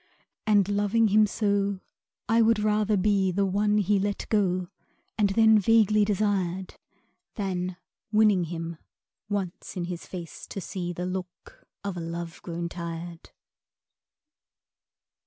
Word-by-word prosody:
And 205 -3 +4
loving 205 +2 +2
him 215 +1 +5
so, 200 -2 0 0.5
I 225 +2 +4
would 225 0 +4
rather 210 0 +2
be 195 -1 +2
The 200 +2 +1
one 205 +2 +2
he 205 0 +2
let 200 +1 -2
go 185 -4 +1 0.5
and 205 -2 +2
then 220 +1 +5
vaguely 215 0 +4
desired, 190 -3 0 0.6
Than, 185 -3 -3 0.3
winning 210 -4 +4
him, 165 0 -5 0.5
once 195 -3 -4
in 175 - -1
his 175 -1 -6
face 170 -4 -8
to - - -6
see 175 -1 -4
The 175 +1 -4
look 185 -1 -7 0.2
of 200 -3 -4
a - - -3
love 170 0 -6
grown 170 0 -4
tired. 170 0 -7
195 Hz, 130 wpm, -27 LUFS, 180-210 Hz, 0.6 s, him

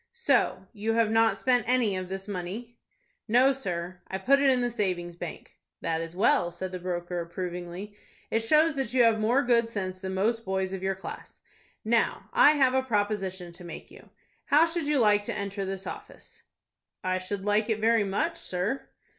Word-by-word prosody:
"So 275 - +1
you 220 +1 -1
have 225 -1 +2
not 225 0 +3
spent 250 -3 +2
any 245 -6 +2
of 185 -1 -4
this 190 +1 -5
money?" 205 +5 -6 0.5
"No, 250 +5 +5
sir; 180 -7 -4
I 190 - -3
put 270 +9 +3
it 280 -1 +4
in 255 -1 +3
the 245 0 0
savings 180 -6 -2
bank." 175 -1 -8 0.3
"That 165 0 -1
is 165 +1 -7
well," 205 -1 +3
said 180 +2 -6
the 185 - -5
broker, 175 0 -3
approvingly. 180 +3 -6 0.4
"It 225 - +2
shows 305 +8 +3
that 260 -2 -2
you 250 - +6
have 225 -1 +4
more 240 +6 +3
good 235 -1 +3
sense 185 -4 -4
than 190 0 -4
most 225 +4 0
boys 190 -1 -2
of 190 - -4
your 190 0 -1
class. 190 - -9 0.5
Now 230 +1 0
I 475 -11 +7
have 265 -4 +3
a 265 - +3
proposition 205 -6 -2
to 175 +1 -12
make 170 -2 -9
to - - -18
you. - - -15 0.4
How 300 +3 +5
should 335 -2 -3
you 295 -1 +2
like 210 -4 +4
to - - -3
enter 200 -1 -3
this 195 0 -5
office?" - - -10 0.6
"I 185 0 0
should 195 +1 -5
like 210 +2 +2
it 220 - +1
very 225 0 +3
much, 195 0 -1
sir." 190 +9 -3
205 Hz, 195 wpm, -28 LUFS, 185-240 Hz, 0.6 s, I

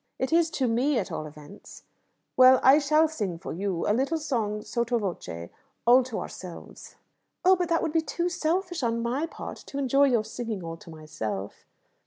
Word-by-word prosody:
"It 260 +3 -2
is 335 -1 +4
to 260 - +1
me, 250 +5 +1
at 195 - -2
all 155 -1 -4
events." 150 +6 -13 0.5
"Well, 255 0 +7
I 270 +3 +7
shall 305 +2 +3
sing 205 - -4
for - - -7
you; 185 0 -2
a 210 - +3
little 275 +8 0
song 220 -9 -2
sotto 235 0 -1
voce, 170 - -5 0.4
all 245 +2 +7
to 250 -4 -4
ourselves." 180 -3 -9 0.5
"Oh, 375 +1 +7
but 355 -1 -2
that 330 -1 +1
would 320 -2 -2
be 325 - +3
too 340 +2 -2
selfish 350 +1 -1
on 230 -1 0
my 260 +7 -1
part, - - -8
to 275 - -7
enjoy 275 +1 +3
your 240 -5 +2
singing 220 -3 -5
all 165 0 -6
to 170 - -15
myself." 110 -11 -6
240 Hz, 190 wpm, -27 LUFS, 195-305 Hz, 0.5 s, Well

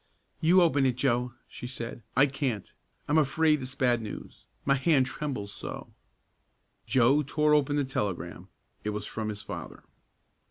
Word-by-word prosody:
"You 180 +3 +6
open 140 -5 +3
it, 125 - +1
Joe," 125 -2 +1
she 125 - -8
said. 120 -2 -6 0.2
"I 135 - +7
can't. 135 -7 -3 0.3
I'm 150 +2 +4
afraid 155 +1 +3
it's 130 +1 -6
bad 125 -3 +2
news. 110 - -8 0.2
My 140 - +4
hand 135 0 +3
trembles 130 -7 -4
so." - - -7 0.9
Joe 130 +4 +4
tore 150 +2 +2
open 145 -1 +3
the 145 - +2
telegram. 105 -8 -3 0.4
It 105 - -1
was 105 0 -3
from 110 0 -3
his 105 0 -5
father. - - -7
130 Hz, 155 wpm, -29 LUFS, 115-145 Hz, 0.9 s, I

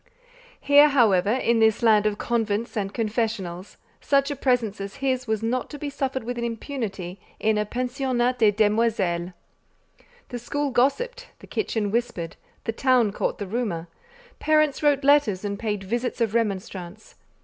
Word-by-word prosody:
Here, 285 +1 +6
however, 210 -9 +3
in 235 -1 +2
this 220 0 +3
land 215 -2 +5
of 205 -1 -1
convents 230 0 -1
and 195 -2 -2
confessionals, 210 -5 -3 0.2
such 275 0 +2
a - - -2
presence 245 -7 0
as 195 0 -6
his 260 -2 -1
was 220 0 -1
not 245 +3 -1
to 295 - -7
be 285 0 -5
suffered 265 -2 -2
with 240 +1 -4
impunity 225 -6 -4 0.2
in 220 0 +2
a 210 - -1
"pensionnat 250 0 -1
de 220 -2 +6
demoiselles." 205 -5 +1 1.0
The 245 - -5
school 285 +4 -2
gossiped, 485 - 0
the - - -14
kitchen 220 - -2
whispered, 210 -8 -2 0.3
the - - -1
town 245 -2 +2
caught - - -2
the 205 - -4
rumour, 195 -6 -3 0.5
parents 305 -2 +2
wrote 290 -2 +3
letters 270 -9 +3
and 200 0 -3
paid 210 -3 -2
visits 240 +6 -2
of 225 -3 0
remonstrance. 195 -3 -3
230 Hz, 155 wpm, -24 LUFS, 205-260 Hz, 1.0 s, Here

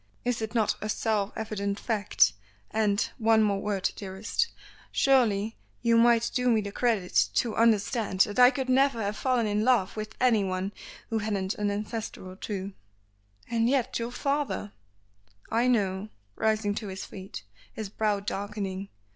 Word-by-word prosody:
Is 245 -2 0
it 220 +2 -4
not 220 -3 +3
a 215 - -3
self 210 -2 0
evident 205 -2 -3
fact; 205 - +2 0.4
and 210 -2 +1 0.2
one 220 -1 +4
more 200 -2 +1
word 200 -3 -1
dearest 195 - -2 0.4
surely 225 -6 +2 0.3
you 230 -1 +4
might 235 0 +4
do 250 -1 +2
me 225 -2 +4
the 200 -1 -5
credit 215 -6 +1
to 235 -3 +1
understand 220 -3 +2
that 205 +4 +2
I 250 0 +9
could 265 -1 -3
never 265 -1 +3
have 205 -1 -2
fallen 250 -2 +1
in 210 0 0
love 230 -6 +2
with 215 0 -6
anyone 195 -6 +1 0.4
who 225 - +1
hadn't 200 -3 -1
an 205 -1 -1
ancestor 210 -1 -4
or 185 - -9
two." 195 0 -5 0.7
"And 230 0 +1
yet 260 -2 +1
your 230 0 -2
father 280 -5 -2 0.4
" 100 - -40 0.3
"I 235 +2 +2
know," 205 -4 +1 0.3
rising 215 -2 +1
to 215 - -4
his 190 0 -6
feet, 190 - -9 0.3
his 215 -3 -6
brow 210 -1 0
darkening. 200 -1 -4
215 Hz, 160 wpm, -28 LUFS, 200-235 Hz, 0.7 s, I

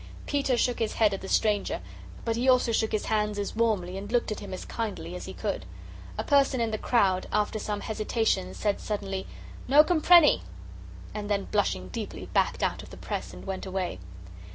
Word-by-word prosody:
Peter 275 -3 +1
shook 245 0 +1
his 225 - 0
head 215 -3 +3
at 195 - -4
the 190 - -7
stranger, 210 -2 +1 0.5
but 230 -1 0
he 250 +3 +2
also 250 -2 +4
shook 220 -1 +1
his 215 - -1
hands 210 -1 0
as 205 +1 -3
warmly 200 -5 0
and 205 +2 -8
looked 240 -2 +1
at 215 - -3
him 200 - -8
as 185 - -6
kindly 215 -5 -4
as - - -6
he - - -6
could. - - -3 0.5
A - - -1
person 275 -3 +3
in 230 -1 0
the 215 - -2
crowd, 190 -6 +2
after 210 +1 0
some 210 -1 -3
hesitation, 215 - -1
said 205 - -1
suddenly, 195 -2 -3 0.4
"No 285 +4 +8
comprenny!" 340 - +6 0.7
and 210 -1 -5
then, 200 -1 0
blushing 95 - 0
deeply, 85 - -5
backed - - +1
out - - 0
of - - -12
the - - -11
press - - -4
and 90 - -11
went 190 0 -4
away. 185 - -3
210 Hz, 200 wpm, -28 LUFS, 195-230 Hz, 0.7 s, No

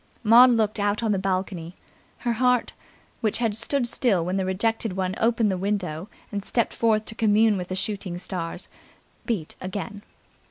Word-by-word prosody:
Maud 235 +3 +8
looked 220 -3 +2
out 205 +2 0
on 220 - +1
to - - +2
the - - -3
balcony. 185 -3 -2 0.4
Her 240 -2 -1
heart, 250 +1 +2 0.5
which 215 -3 0
had 225 -3 0
stood 240 +4 0
still 205 -9 +1
when 180 +2 -1
the 190 - 0
rejected 220 +2 0
one 185 -1 -1
opened 225 -2 +2
the 185 - -2
window 190 -3 -2 0.2
and 200 -2 -3
stepped 235 +2 0
forth 220 -2 +2
to - - -6
commune 220 0 +3
with 180 -2 -4
the 185 - -4
soothing 195 -2 -3
stars, 175 0 -5 0.6
beat 200 -11 -2
again. 205 +2 -5
205 Hz, 175 wpm, -25 LUFS, 185-225 Hz, 0.6 s, Maud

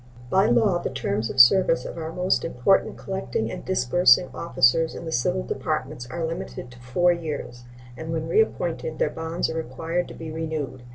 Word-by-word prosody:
By 195 +2 +4
law 205 -6 +3
the - - -3
terms 115 -4 -2
of 130 - -3
service 165 +7 +6
of - - -6
our 160 -1 -5
most 180 +2 0
important 165 +5 +1
collecting 120 -12 -3
and - - -7
disbursing 180 +2 +3
officers 165 -1 +2
in - - -7
the 160 - -5
civil 120 - 0
departments 120 - -3
are 170 +3 -3
limited 160 -6 -6
to 125 - -15
four 175 +9 +2
years, 145 -7 -6 0.3
and 160 +4 -6
when 160 -1 -2
reappointed 485 +2 0
their - - 0
bonds 165 +2 -2
are - - -4
required 165 +4 -3
to - - -10
be 160 -1 -7
renewed. 155 -5 -4
160 Hz, 180 wpm, -24 LUFS, 125-175 Hz, 0.3 s, service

